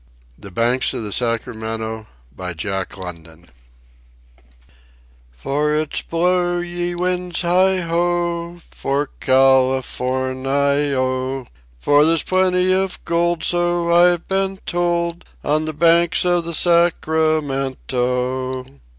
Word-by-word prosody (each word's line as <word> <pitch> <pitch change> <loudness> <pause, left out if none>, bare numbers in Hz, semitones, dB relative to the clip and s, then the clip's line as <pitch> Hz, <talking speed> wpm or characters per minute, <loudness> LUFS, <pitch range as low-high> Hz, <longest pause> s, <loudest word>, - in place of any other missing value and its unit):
THE 100 - -11
BANKS 120 +7 +1
OF 120 - -4
THE 105 - -6
SACRAMENTO 110 -1 -3 0.3
"And 90 -2 -6 2.4
it's 155 - -4
blow, 175 +1 +1
ye 175 0 -3
winds, 180 0 -1
heigh 185 +2 +3
ho, 170 0 -1
For 140 +1 -2
Cal 130 0 +4
i - - -3
for 130 +1 -2
ni 140 +2 0
o; 130 0 -2 0.3
For 145 - +4
there's 165 +1 +2
plenty 185 0 +2
of 190 0 -1
gold 170 0 0
so 175 -1 +1
I've 175 0 +4
been 195 0 0
told, 175 -1 -1 0.2
On 155 +2 +1
the 155 - -4
banks 170 +3 +3
of 175 -1 +2
the 170 -1 -3
Sacramento!" 135 -6 0
155 Hz, 105 wpm, -20 LUFS, 130-175 Hz, 2.4 s, Cal